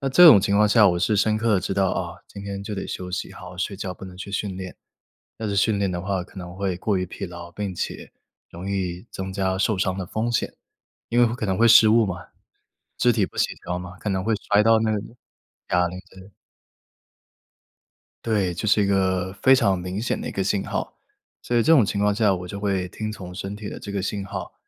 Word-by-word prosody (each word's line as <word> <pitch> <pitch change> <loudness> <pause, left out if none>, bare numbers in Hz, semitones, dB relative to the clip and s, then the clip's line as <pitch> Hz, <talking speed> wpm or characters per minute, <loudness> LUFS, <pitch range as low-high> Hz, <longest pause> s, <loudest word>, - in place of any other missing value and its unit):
那 135 - -1
这 175 +6 +8
种 105 -11 +10
情 100 +1 +1
况 105 0 +5
下 105 -2 +6
我 85 -1 +1
是 100 +4 +1
深 105 +1 +2
刻 110 -1 +2
地 95 - +2
知 - - -3
道， 95 -1 +2
啊， - - -3
今 100 - -9
天 100 -1 -5
就 105 0 -5
得 95 - -4
休 90 - -5
息， 90 - -4
好 90 - -10
好 90 - -12
睡 95 +2 -2
觉， 95 -2 -5
不 - - -11
能 90 -1 -10
去 95 +2 -8
训 100 -1 -2
练。 95 -1 -7 0.6
要 110 - -4
是 100 - -2
训 100 +2 +2
练 100 -2 +1
的 90 -1 -3
话 95 -1 -1
可 95 - -17
能 90 -1 -7
会 95 -2 -2
过 100 +1 0
于 90 - -1
疲 - - -6
劳， 85 -2 -9
并 100 +1 -4
且 - - -5 0.4
容 90 +4 -7
易 95 +1 -3
增 95 0 -5
加 95 -1 0
受 100 +1 +1
伤 95 0 0
的 95 - -3
风 110 +6 -2
险， 120 - -1 0.6
因 120 - -1
为 120 - +7
会 115 - -1
可 115 - -3
能 95 -2 0
会 115 - +4
失 115 -1 +8
误 115 0 +5
嘛， 90 -2 -6 0.7
肢 120 - +4
体 105 -5 +2
不 - - -15
协 - - +3 0.2
调 90 +1 -2
嘛， 90 0 -9
可 105 - -3
能 95 -1 0
会 110 +2 +1
摔 105 0 +2
到 115 0 +5
那 110 0 +1
个 105 - 0 0.7
哑 90 0 +3
铃， 90 +1 -7
对。 95 +1 -15 1.9
对， 105 -6 +1
就 85 +5 -4
是 105 0 +4
一 - - +1
个 95 -1 +1
非 130 - +7
常 100 -8 +2
明 90 +3 -4
显 125 - -1
的 - - -5
一 - - -3
个 100 - -1
信 95 +1 0
号。 - - -4 0.4
所 120 - -2
以 120 - +4
这 160 - +4
种 125 -10 +6
情 100 - -2
况 105 0 +3
下 105 -3 +3
我 90 0 -6
就 100 - -6
会 95 -3 -1
听 110 +4 -5
从 90 -4 -9
身 95 +2 -5
体 105 0 -7
的 - - -7
这 100 - -7
个 100 -2 -2
信 100 0 -3
号， - - -6
100 Hz, 270 characters per minute, -24 LUFS, 95-105 Hz, 1.9 s, 种